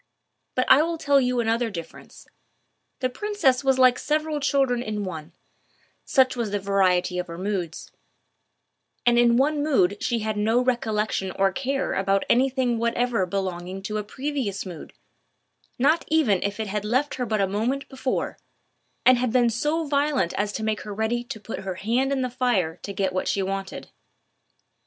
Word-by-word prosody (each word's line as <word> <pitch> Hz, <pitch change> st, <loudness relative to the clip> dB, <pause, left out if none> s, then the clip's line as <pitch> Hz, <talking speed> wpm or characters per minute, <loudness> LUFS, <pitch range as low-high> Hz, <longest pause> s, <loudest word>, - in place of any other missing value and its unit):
But 255 Hz, -, +2 dB
I 280 Hz, -, +7 dB
will 335 Hz, +1 st, -1 dB
tell 285 Hz, -2 st, +3 dB
you 250 Hz, -1 st, 0 dB
another 230 Hz, +1 st, +1 dB
difference: 170 Hz, -5 st, -10 dB, 0.8 s
the 255 Hz, -, +2 dB
princess 345 Hz, -8 st, +1 dB
was 265 Hz, -1 st, +3 dB
like 255 Hz, -1 st, +5 dB
several 305 Hz, 0 st, -1 dB
children 275 Hz, -4 st, +1 dB
in 210 Hz, -3 st, -3 dB
one—such 185 Hz, -, -3 dB
was 235 Hz, -3 st, -2 dB
the 205 Hz, -, -1 dB
variety 185 Hz, -2 st, +1 dB
of 180 Hz, -, -3 dB
her 170 Hz, -1 st, -8 dB
moods; 185 Hz, -3 st, -4 dB, 1.1 s
and 240 Hz, 0 st, +5 dB
in 240 Hz, 0 st, +5 dB
one 290 Hz, +3 st, +2 dB
mood 205 Hz, -10 st, +2 dB
she 240 Hz, -, 0 dB
had 215 Hz, 0 st, -2 dB
no 220 Hz, +3 st, +2 dB
recollection 220 Hz, -6 st, 0 dB
or 195 Hz, 0 st, +2 dB
care 270 Hz, +4 st, -2 dB
about 195 Hz, 0 st, +1 dB
any 260 Hz, +3 st, +4 dB
thing 250 Hz, -3 st, 0 dB
whatever 235 Hz, -3 st, 0 dB
belonging 185 Hz, 0 st, -4 dB
to 215 Hz, +2 st, -2 dB
a -, -, -3 dB
previous 255 Hz, -3 st, -3 dB
mood—not 250 Hz, -, -4 dB
even 280 Hz, -, +2 dB
if 200 Hz, +1 st, -3 dB
it 220 Hz, -, -1 dB
had 210 Hz, 0 st, -3 dB
left 255 Hz, +7 st, 0 dB
her 250 Hz, -1 st, -2 dB
but 215 Hz, -1 st, 0 dB
a 195 Hz, -, +3 dB
moment 230 Hz, +8 st, -2 dB
before, 260 Hz, -1 st, -3 dB, 0.7 s
and 255 Hz, -1 st, +6 dB
had 250 Hz, -2 st, 0 dB
been 240 Hz, -1 st, +3 dB
so 300 Hz, +8 st, 0 dB
violent 285 Hz, -, +1 dB
as 205 Hz, +1 st, -1 dB
to 220 Hz, -, -4 dB
make 215 Hz, -1 st, -1 dB
her 210 Hz, -1 st, -7 dB
ready 225 Hz, +3 st, -1 dB
to 225 Hz, -, -7 dB
put 225 Hz, -, -6 dB
her 190 Hz, -1 st, -5 dB
hand 240 Hz, +8 st, 0 dB
in 270 Hz, -2 st, 0 dB
the 255 Hz, -, -1 dB
fire 220 Hz, -10 st, 0 dB
to 200 Hz, -, -6 dB
get 190 Hz, -1 st, -1 dB
what 185 Hz, -, -1 dB
she 195 Hz, -, 0 dB
wanted. 195 Hz, 0 st, -5 dB
235 Hz, 175 wpm, -24 LUFS, 195-265 Hz, 1.1 s, I